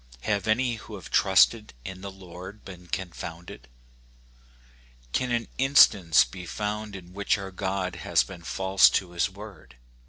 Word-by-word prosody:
Have 105 - -1
any 120 +2 +1
who 105 0 -10
have 95 - -11
trusted 105 - +3
in 95 0 -7
the 100 - -6
Lord 95 +2 -11
been 90 -2 -11
confounded? 85 -6 -7 1.5
Can 125 -1 0
an 120 -1 -1
instance 95 - +6
be 90 -2 -10
found 105 +1 -4
in 90 -1 -11
which 100 +1 0
our 95 -1 -7
God 95 -1 -3
has - - +2
been 90 -3 -11
false 95 +3 +4
to 90 -3 -1
his 85 +2 0
word 95 - -12
95 Hz, 150 wpm, -26 LUFS, 90-105 Hz, 1.5 s, instance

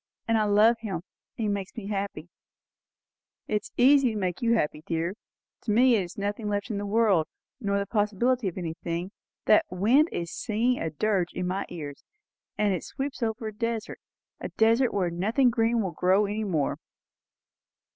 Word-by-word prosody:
And 225 - +2
I 215 -1 +3
love 210 +3 +5
him; 215 -5 -4
and 165 - -5 0.3
he 220 - -2
makes 200 -2 -3
me 220 - -5
happy." 195 -5 -3 1.2
"It 210 -1 0
is - - -13
easy 265 -1 +5
to - - -3
make 180 -3 -2
you 235 -1 +3
happy, 150 -6 -1
dear. 165 +2 -1 0.5
To 220 - 0
me 245 +4 +5
there 210 -4 +3
is 175 - -10
nothing 205 +1 -2
left 205 +3 -2
in 200 - -2
the 205 - -4
world, 200 -6 +3 0.3
nor 200 -4 0
the 200 - -1
possibility 215 +3 +1
of 180 - -4
anything. 170 +1 -4 0.3
That 215 - +5
wind 230 - +3
is 170 0 -4
singing 240 +2 0
a 165 - -1
dirge 180 +2 0
in 180 - -3
my 185 +2 -2
ears; 145 -5 -7 0.5
and 205 -2 +2
it 180 - -3
sweeps 275 0 -5
over 220 0 -2
a - - -11
desert. 230 0 -3 0.4
A - - -5
desert 230 +3 +3
where 185 -4 0
nothing 220 +9 +2
green 230 0 +1
will 190 - -2
grow 185 +5 +3
any 210 +2 -2
more!" 160 -8 -1
205 Hz, 185 wpm, -27 LUFS, 185-230 Hz, 1.2 s, love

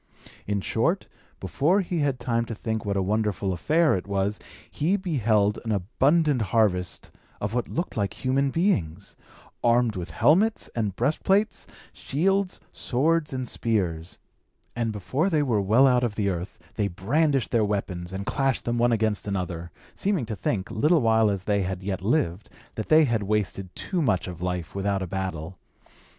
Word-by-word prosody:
In 100 -1 0
short, - - 0 0.3
before 150 - +1
he 175 -2 -2
had 140 -4 0
time 115 -1 0
to 115 - -6
think 110 +1 -3
what 100 -1 -1
a 95 - +1
wonderful 105 -1 0
affair 155 - +2
it 95 - -4
was, 100 +1 -1 0.3
he 175 +7 +1
beheld 110 - +1
an 115 - -2
abundant 135 - +2
harvest 100 -4 0 0.3
of 105 +1 -3
what 125 0 -1
looked 170 +3 -3
like 100 +4 -3
human 135 +2 +2
beings, 100 - -1 0.5
armed 120 -2 +3
with 90 -2 -5
helmets 205 +9 +2
and 105 -5 -1
breastplates, 195 - +1 0.3
shields, 190 +6 0
swords 155 +5 0
and 130 -2 -3
spears; 90 -9 -2 0.6
and 115 -1 -1
before 130 - -1
they 155 -5 +2
were 115 -7 +1
well 110 +7 +5
out 125 -2 +4
of 115 -4 -1
the 100 -3 0
earth, 90 0 -4 0.2
they 105 -2 +1
brandished 135 - 0
their 115 -3 +3
weapons, 95 -4 -3
and 95 +1 -5
clashed 135 0 0
them 120 0 0
one 120 0 +3
against 110 -2 0
another, 90 -4 -3 0.2
seeming 195 - -1
to 110 - -4
think, 95 0 -2
little 150 +8 +3
while 110 -2 +4
as 100 -2 -2
they 100 0 +1
had 95 0 -3
yet 95 -2 -3
lived, 100 - 0 0.2
that 110 - -5
they 155 0 +6
had 115 -4 0
wasted 100 -2 -1
too 185 -3 -2
much 95 - +1
of 90 -1 -8
life 90 -2 -3
without 100 0 -1
a - - -2
battle. 95 -2 -4
110 Hz, 170 wpm, -25 LUFS, 95-140 Hz, 0.6 s, they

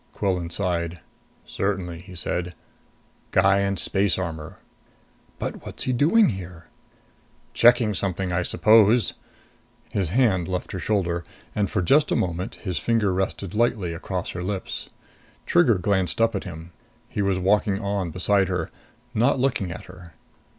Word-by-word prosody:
Quillan 90 -4 -1
sighed. 85 -2 -2 0.5
"Certainly," 95 -4 -3
he 90 +1 -12
said. 90 +1 -3 0.7
"Guy 95 +1 +4
in 100 0 0
space 95 0 +2
armor." 80 -4 -5 0.8
"But - - -5
what's - - -2
he 130 - 0
doing 150 - +4
there?" 90 -3 -11 0.8
"Checking 120 -2 +5
something, 95 -1 -2
I 90 - +1
suppose." 110 +3 +4 0.8
His 100 -7 -1
hand 100 -5 +2
left 90 -1 -3
her 95 - -4
shoulder; 90 -4 0 0.3
and, 105 -1 0
for 95 - 0
just 145 - +3
a - - +3
moment, 90 +1 -2
his 90 -7 -4
finger 110 -1 +1
rested 95 0 -2
lightly 105 -6 +1
across 90 +2 -4
her 90 - -5
lips. 95 +1 -4 0.6
Trigger 110 +6 +4
glanced 95 0 0
up 115 0 +3
at - - -3
him. 85 -1 -9 0.4
He 105 - -3
was 100 -2 +1
walking 100 +1 +2
on 100 -3 -2
beside 95 +3 +1
her, 90 -3 -2 0.4
not 120 +5 +3
looking 125 -9 0
at 90 - -8
her. 90 -3 -13
95 Hz, 145 wpm, -24 LUFS, 90-105 Hz, 0.8 s, Checking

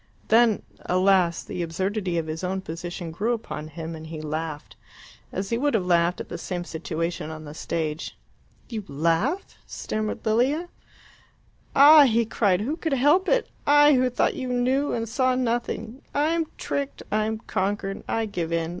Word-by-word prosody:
Then, 225 -1 +4 0.2
alas! 185 -2 +3
the 180 - -5
absurdity 185 +2 -2
of 165 - -1
his 160 +2 -5
own 190 +1 -1
position 175 0 -6
grew 215 +9 0
upon 185 -9 -5
him, 160 +1 -6
and 160 0 -9
he 160 -1 -6
laughed 155 0 -5 0.6
as 195 +3 -4
he 230 - +1
would 290 -1 +1
have 190 -5 +1
laughed 175 0 +2
at - - -6
the - - -6
same 180 -2 -4
situation 165 -1 -4
on 155 0 -8
the 145 - -8
stage. 160 0 -3 0.5
"You 220 -4 -5
laugh?" 165 - 0
stammered 215 0 -4
Lilia. 265 +10 +1 1.1
"Ah!" 290 +1 +9
he 230 -2 +2
cried, 200 -4 +1
"who 285 +9 -2
could 320 -4 -2
help 295 +9 +3
it? - - +2 0.2
I, 290 +1 +7
who 255 -1 +3
thought 250 - +1
you 255 - -4
knew 255 +3 +1
and 230 -1 -2
saw 255 +2 +1
nothing 235 0 -2
I 295 +2 +2
am 330 -1 0
tricked 280 -1 -3
I 215 0 +2
am 220 0 -2
conquered. 195 -1 -2
I 225 0 0
give 175 -6 -3
in. 165 -1 0
205 Hz, 170 wpm, -25 LUFS, 170-255 Hz, 1.1 s, Ah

